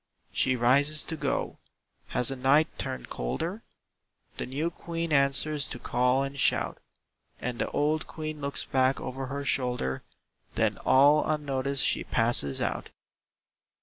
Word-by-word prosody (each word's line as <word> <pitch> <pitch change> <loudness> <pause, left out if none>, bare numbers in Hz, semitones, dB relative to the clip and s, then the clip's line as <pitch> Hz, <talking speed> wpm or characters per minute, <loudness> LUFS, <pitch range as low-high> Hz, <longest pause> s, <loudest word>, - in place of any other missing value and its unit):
She 130 - +2
rises 140 +5 +3
to 160 - -4
go. - - -3 0.5
Has 125 -1 +1
the 135 - 0
night 135 +4 +2
turned 60 - -4
colder? 165 - -4 0.8
The - - -4
new 150 +6 -2
Queen 165 -1 -4
answers 140 +2 +2
to - - -6
call 125 +2 +1
and 140 0 -6
shout; - - +2 0.6
And 125 -1 -5
the - - -1
old 150 +1 -1
Queen 155 -1 -6
looks 140 0 0
back 130 0 +1
over 135 +1 -5
her 140 +2 -5
shoulder, 125 - 0 0.5
Then - - 0
all 145 +3 +5
unnoticed 140 -3 -1
she - - 0
passes 115 - +4
out. - - -3
140 Hz, 140 wpm, -27 LUFS, 125-150 Hz, 0.8 s, all